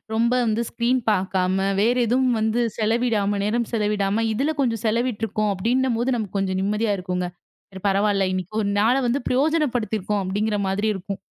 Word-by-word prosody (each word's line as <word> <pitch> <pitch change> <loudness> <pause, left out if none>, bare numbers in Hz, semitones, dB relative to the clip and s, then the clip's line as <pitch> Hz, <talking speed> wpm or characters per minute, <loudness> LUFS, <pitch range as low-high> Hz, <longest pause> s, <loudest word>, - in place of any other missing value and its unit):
ரொம்ப 235 +2 +2
வந்து 220 +2 +1
ஸ்கிரீன் 245 +2 +1
பாக்காம, 190 -1 +1 0.2
வேற 235 +4 +3
எதுவும் 250 0 +2
வந்து 220 +2 +1 0.2
செலவிடாம, 215 -3 +1
நேரம் 235 +2 0
செலவிடாம 210 0 0
இதுல 285 +8 0
கொஞ்சம் 230 -4 0
செலவிட்டுருக்கோம். 220 -2 0
அப்டின்னும்போது 245 +4 0
நமக்கு 205 -3 -4
கொஞ்சம் 190 -1 -1
நிம்மதியா 210 +1 0
இருக்குங்க. 180 -1 -2 0.4
சரி. 190 -1 -10
பரவால்ல 200 0 +2
இன்னைக்கு 185 +2 -4
1 200 - -1
நாள 235 +5 +3
வந்து 250 +4 0
பிரயோஜனப்படுத்திருக்கோம். 245 - 0
அப்டிங்கற 205 +2 -1
மாதிரி 205 +3 0
இருக்கும். 195 +1 -5
215 Hz, 150 wpm, -23 LUFS, 195-235 Hz, 0.4 s, வேற